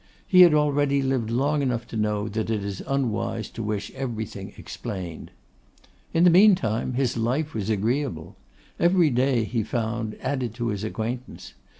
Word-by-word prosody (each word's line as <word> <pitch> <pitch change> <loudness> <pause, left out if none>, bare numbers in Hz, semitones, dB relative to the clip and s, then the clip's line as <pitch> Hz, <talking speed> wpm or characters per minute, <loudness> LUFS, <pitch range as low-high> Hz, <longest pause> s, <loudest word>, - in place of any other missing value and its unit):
He 185 -1 +6
had 170 -4 +8
already 145 -2 +2
lived 130 -4 0
long 140 +5 +1
enough 125 -4 -1
to - - -7
know 105 -1 0
that 110 +1 -3
it 110 -3 -1
is 100 -2 -5
unwise 115 -5 -1
to - - -6
wish 105 -2 -3
everything 110 -7 -5
explained. 90 -5 -7 0.8
In 165 - +3
the 180 - +7
meantime 170 - +4
his 125 -2 0
life 130 +7 -1
was 105 -2 -3
agreeable. 110 - -1 0.4
Every 175 -3 +4
day, 125 -1 +2
he 115 +1 -1
found, 110 0 -3
added 130 -4 -2
to 120 -1 -2
his 105 -1 -3
acquaintance. 115 +3 -5
120 Hz, 160 wpm, -25 LUFS, 110-140 Hz, 0.8 s, had